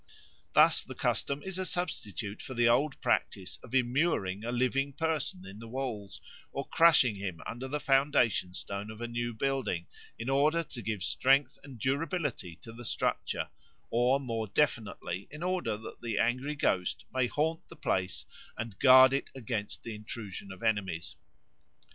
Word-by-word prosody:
Thus -, -, +6 dB
the -, -, -9 dB
custom 140 Hz, +1 st, -1 dB
is 190 Hz, -1 st, -4 dB
a -, -, 0 dB
substitute 105 Hz, -, -2 dB
for 130 Hz, -, -7 dB
the 120 Hz, 0 st, +4 dB
old 135 Hz, +4 st, +3 dB
practice 95 Hz, -2 st, 0 dB
of -, -, -7 dB
immuring 120 Hz, -, +1 dB
a 120 Hz, -, -2 dB
living 130 Hz, +3 st, +1 dB
person 150 Hz, -, -1 dB
in 95 Hz, +2 st, -10 dB
the 115 Hz, -, -9 dB
walls, 115 Hz, -5 st, -4 dB, 0.3 s
or -, -, -4 dB
crushing 150 Hz, -10 st, +5 dB
him 95 Hz, -4 st, -4 dB
under 125 Hz, +3 st, -5 dB
the 150 Hz, +3 st, -2 dB
foundation 135 Hz, -10 st, +2 dB
stone 100 Hz, +2 st, -4 dB
of 110 Hz, 0 st, -9 dB
a 120 Hz, -, -3 dB
new 120 Hz, 0 st, -2 dB
building, 125 Hz, -7 st, -1 dB, 0.3 s
in 115 Hz, -, -5 dB
order 150 Hz, +5 st, +3 dB
to 130 Hz, -6 st, -7 dB
give 110 Hz, -4 st, -3 dB
strength 135 Hz, 0 st, +3 dB
and 135 Hz, -3 st, -10 dB
durability 140 Hz, -, -1 dB
to 115 Hz, -, -9 dB
the 120 Hz, +1 st, -9 dB
structure, -, -, -1 dB, 0.4 s
or 125 Hz, +3 st, +3 dB
more 115 Hz, -5 st, -3 dB
definitely 100 Hz, -7 st, -1 dB
in 150 Hz, +3 st, -8 dB
order 180 Hz, -, 0 dB
that 110 Hz, -, -10 dB
the 115 Hz, -3 st, -2 dB
angry 130 Hz, +6 st, +1 dB
ghost 90 Hz, -10 st, 0 dB
may 130 Hz, -1 st, +2 dB
haunt 160 Hz, +5 st, 0 dB
the -, -, -12 dB
place 95 Hz, -1 st, -1 dB, 0.3 s
and 115 Hz, -4 st, -5 dB
guard 130 Hz, 0 st, +8 dB
it 135 Hz, -, -1 dB
against 115 Hz, -5 st, -4 dB
the 115 Hz, -, -5 dB
intrusion 105 Hz, -2 st, -7 dB
of 95 Hz, +4 st, -10 dB
enemies. 95 Hz, -8 st, -1 dB
120 Hz, 165 wpm, -31 LUFS, 105-140 Hz, 0.4 s, guard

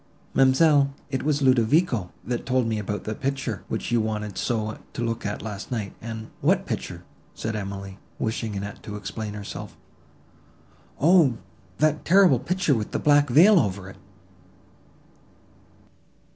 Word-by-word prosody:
Ma'amselle, 140 Hz, +1 st, +4 dB, 0.2 s
it 130 Hz, -2 st, -1 dB
was 145 Hz, -1 st, 0 dB
Ludovico, 130 Hz, -, +3 dB
that 120 Hz, 0 st, -2 dB
told 130 Hz, -1 st, +1 dB
me 110 Hz, -1 st, -1 dB
about 105 Hz, 0 st, -4 dB
that 110 Hz, 0 st, -5 dB
picture, 135 Hz, -6 st, -2 dB
which -, -, -4 dB
you 120 Hz, -1 st, +3 dB
wanted 105 Hz, -2 st, -3 dB
so 110 Hz, -3 st, -2 dB
to 120 Hz, -, -3 dB
look 115 Hz, -2 st, -2 dB
at 100 Hz, -, -4 dB
last 105 Hz, -2 st, -6 dB
night, 105 Hz, -5 st, -3 dB
and—" 110 Hz, -1 st, -7 dB
"What -, -, +2 dB
picture?" -, -, -5 dB, 0.3 s
said 110 Hz, 0 st, -3 dB
Emily, 100 Hz, -1 st, -6 dB, 0.2 s
wishing 110 Hz, -1 st, -2 dB
Annette 100 Hz, +1 st, -6 dB
to 105 Hz, -, -7 dB
explain 105 Hz, +1 st, -5 dB
herself. 100 Hz, -1 st, -7 dB, 1.2 s
"O! 155 Hz, -6 st, +5 dB, 0.4 s
that 155 Hz, 0 st, +1 dB
terrible 180 Hz, -7 st, +5 dB
picture 180 Hz, +4 st, +1 dB
with 110 Hz, -4 st, -2 dB
the -, -, +1 dB
black 145 Hz, -1 st, +4 dB
veil 180 Hz, -, +7 dB
over 95 Hz, -, -2 dB
it." -, -, -16 dB
115 Hz, 145 wpm, -25 LUFS, 105-140 Hz, 1.2 s, veil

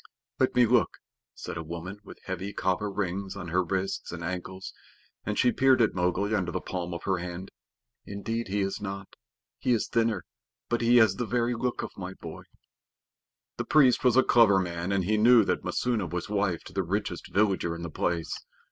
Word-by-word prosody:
"Let 130 Hz, -, +2 dB
me 125 Hz, -1 st, +6 dB
look," 120 Hz, 0 st, +2 dB, 0.4 s
said -, -, -6 dB
a 80 Hz, -, -4 dB
woman 85 Hz, +5 st, -7 dB
with -, -, -12 dB
heavy 95 Hz, +2 st, -4 dB
copper 95 Hz, +2 st, 0 dB
rings 95 Hz, -1 st, -3 dB
on 95 Hz, -3 st, -6 dB
her 90 Hz, +3 st, +2 dB
wrists 95 Hz, +2 st, -2 dB
and 85 Hz, 0 st, -6 dB
ankles, 95 Hz, +2 st, -5 dB, 0.5 s
and 105 Hz, -, -1 dB
she 125 Hz, -, +4 dB
peered 130 Hz, +1 st, +4 dB
at 115 Hz, -, +3 dB
Mowgli 90 Hz, +4 st, 0 dB
under 95 Hz, -5 st, 0 dB
the 95 Hz, -, -2 dB
palm 90 Hz, -1 st, -4 dB
of 85 Hz, -, -5 dB
her 95 Hz, -2 st, 0 dB
hand. 90 Hz, +2 st, -6 dB, 0.6 s
"Indeed 115 Hz, +3 st, -3 dB
he 100 Hz, +1 st, -1 dB
is 95 Hz, +2 st, -2 dB
not. 100 Hz, -1 st, -6 dB, 0.4 s
He 125 Hz, -, +2 dB
is 115 Hz, -, 0 dB
thinner, 115 Hz, -4 st, 0 dB, 0.4 s
but 120 Hz, 0 st, 0 dB
he 120 Hz, +1 st, +5 dB
has 110 Hz, -5 st, +5 dB
the 120 Hz, -, -2 dB
very 120 Hz, 0 st, +1 dB
look 120 Hz, +1 st, -2 dB
of -, -, -5 dB
my 95 Hz, 0 st, -6 dB
boy." -, -, -9 dB, 1.1 s
The -, -, -2 dB
priest 135 Hz, -5 st, +4 dB
was 125 Hz, -1 st, +4 dB
a 130 Hz, -, +7 dB
clever 115 Hz, -5 st, +5 dB
man, 85 Hz, 0 st, -3 dB
and 100 Hz, -1 st, +1 dB
he 105 Hz, +3 st, +2 dB
knew 115 Hz, +1 st, +7 dB
that -, -, -1 dB
Messua 115 Hz, -7 st, -1 dB
was 85 Hz, +2 st, -4 dB
wife 100 Hz, -5 st, 0 dB
to -, -, -12 dB
the 95 Hz, -, 0 dB
richest 100 Hz, +4 st, -3 dB
villager 95 Hz, -5 st, +1 dB
in 85 Hz, -, -7 dB
the 85 Hz, -, -5 dB
place. 85 Hz, +1 st, -1 dB
100 Hz, 200 wpm, -28 LUFS, 90-115 Hz, 1.1 s, a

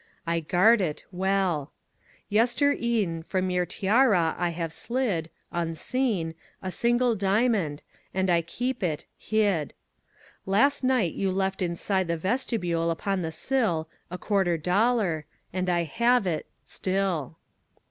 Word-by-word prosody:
I 170 Hz, 0 st, 0 dB
guard 185 Hz, +8 st, +4 dB
it 155 Hz, -5 st, -2 dB
Well. 185 Hz, -5 st, 0 dB, 0.6 s
Yestere'en 230 Hz, -, +1 dB
From 185 Hz, -1 st, 0 dB
your 180 Hz, -1 st, +1 dB
tiara 195 Hz, -3 st, +3 dB
I 175 Hz, 0 st, 0 dB
have 165 Hz, -1 st, -4 dB
slid, 215 Hz, -10 st, -1 dB, 0.2 s
Unseen, 170 Hz, +2 st, -1 dB, 0.3 s
A 185 Hz, -, -5 dB
single 240 Hz, +3 st, +2 dB
diamond, 195 Hz, -6 st, +1 dB, 0.3 s
And 190 Hz, 0 st, 0 dB
I 170 Hz, -2 st, +3 dB
keep 245 Hz, +9 st, -3 dB
it 160 Hz, -5 st, -2 dB
Hid. 205 Hz, -9 st, 0 dB, 0.7 s
Last 270 Hz, +9 st, +3 dB
night 255 Hz, -10 st, +2 dB
you 195 Hz, -1 st, -1 dB
left 190 Hz, 0 st, -1 dB
inside 185 Hz, +2 st, 0 dB
the 170 Hz, 0 st, -1 dB
vestibule 180 Hz, -4 st, -1 dB
upon 190 Hz, +3 st, -1 dB
the 160 Hz, -1 st, -3 dB
sill 170 Hz, -3 st, 0 dB, 0.2 s
A 180 Hz, -, -5 dB
quarter 190 Hz, -4 st, +1 dB
dollar, 180 Hz, -, +1 dB, 0.3 s
And 185 Hz, 0 st, -1 dB
I 175 Hz, -1 st, +2 dB
have 235 Hz, -, +2 dB
it 165 Hz, -4 st, -2 dB, 0.2 s
Still. 185 Hz, -6 st, -2 dB
190 Hz, 125 wpm, -27 LUFS, 170-225 Hz, 0.7 s, guard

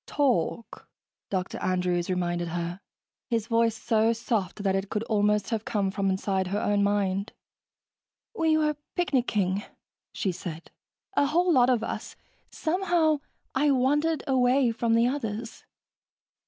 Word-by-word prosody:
"Talk," 245 Hz, -, -1 dB, 0.4 s
Dr. 185 Hz, -1 st, -2 dB
Andrews 180 Hz, -1 st, 0 dB
reminded 175 Hz, -1 st, -1 dB
her, 175 Hz, +2 st, -4 dB, 0.5 s
his 230 Hz, -3 st, 0 dB
voice 230 Hz, -1 st, +2 dB
so 225 Hz, +1 st, +2 dB
soft 215 Hz, -4 st, -2 dB
that 195 Hz, -1 st, +2 dB
it 195 Hz, 0 st, -2 dB
could 210 Hz, 0 st, -2 dB
almost 210 Hz, -1 st, +1 dB
have 225 Hz, -2 st, -1 dB
come 200 Hz, -4 st, -1 dB
from 195 Hz, 0 st, 0 dB
inside 190 Hz, 0 st, 0 dB
her 200 Hz, +3 st, -1 dB
own 205 Hz, -1 st, +1 dB
mind. 200 Hz, 0 st, 0 dB, 1.0 s
"We 320 Hz, -7 st, +2 dB
were 300 Hz, -1 st, +1 dB, 0.2 s
picnicking," 215 Hz, -, +1 dB, 0.5 s
she 190 Hz, -, -1 dB
said. 170 Hz, -2 st, -8 dB, 0.4 s
"A 285 Hz, -, +3 dB
whole 345 Hz, +4 st, +3 dB
lot 250 Hz, -2 st, +5 dB
of 240 Hz, -3 st, +2 dB
us. -, -, -5 dB, 0.3 s
Somehow, 335 Hz, -3 st, +1 dB, 0.3 s
I 290 Hz, +3 st, +2 dB
wandered 290 Hz, +4 st, +2 dB
away 255 Hz, -1 st, +3 dB
from 230 Hz, 0 st, +1 dB
the 230 Hz, +1 st, +4 dB
others...." 230 Hz, -4 st, -4 dB
225 Hz, 135 wpm, -27 LUFS, 195-265 Hz, 1.0 s, lot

